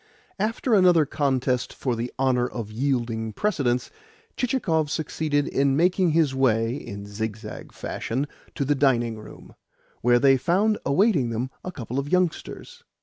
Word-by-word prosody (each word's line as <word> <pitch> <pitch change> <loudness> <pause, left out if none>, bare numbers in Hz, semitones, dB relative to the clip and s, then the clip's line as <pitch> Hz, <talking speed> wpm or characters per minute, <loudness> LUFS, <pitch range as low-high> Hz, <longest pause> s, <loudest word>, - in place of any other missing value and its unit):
After 225 +4 0
another 180 -6 +5
contest 130 -3 0
for 125 -3 -1
the 120 +2 -4
honour 130 -2 +2
of 115 -4 -6
yielding 115 -3 -1
precedence, 125 - 0 0.4
Chichikov 180 - 0
succeeded 150 -1 -1
in 135 0 +2
making 180 +2 +3
his 155 -3 +2
way 115 -3 +2
(in 100 -7 -7
zigzag 110 +1 -6
fashion) 130 +5 -3 0.3
to 140 - -1
the 145 - +2
dining 120 -5 +1
room, 105 - -13 0.5
where 120 +1 +4
they 135 +1 +5
found 195 - +1
awaiting 145 - +3
them 120 +3 -3
a 185 - -5
couple 125 -4 -4
of 140 +1 -4
youngsters. 185 - -2
135 Hz, 145 wpm, -25 LUFS, 120-165 Hz, 0.5 s, another